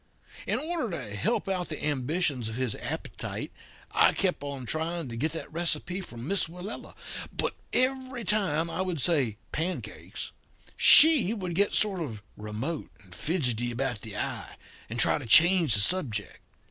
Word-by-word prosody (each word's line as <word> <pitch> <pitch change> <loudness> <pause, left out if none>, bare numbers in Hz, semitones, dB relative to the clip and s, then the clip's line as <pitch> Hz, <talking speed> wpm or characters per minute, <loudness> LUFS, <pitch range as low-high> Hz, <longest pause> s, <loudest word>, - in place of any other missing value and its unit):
In - - +1
order 320 -6 -3
to 105 - -8
help 100 - -1
out 185 -2 -2
the 155 - -5
ambitions 145 -3 -1
of 110 - -7
his 125 -3 -1
appetite - - -5 0.4
I - - +4
kept 185 -6 -1
on 140 -3 -6
trying 160 +2 -3
to 115 - -6
get 150 +7 -1
that 160 - -7
receipt 175 +3 -1
from 120 +2 -9
Miss 195 -3 +1
Willella. 180 +5 -8 0.4
But - - -2 0.2
every 260 -1 -1
time 185 -6 0
I 165 +2 -4
would 180 -4 -2
say 135 - +2
'pancakes' 175 +4 -5 0.4
she 275 - +8
would 185 -5 -5
get 200 +4 +1
sort 195 -4 +2
of 110 -10 -6
remote 110 +10 -5
and 90 -2 -16
fidgety 125 - -1
about 120 -2 -3
the 105 -2 -8
eye, - - -4 0.3
and - - -5
try - - +4
to - - -8
change 170 - +6
the - - +3
subject. 115 - 0
160 Hz, 160 wpm, -27 LUFS, 125-185 Hz, 0.4 s, she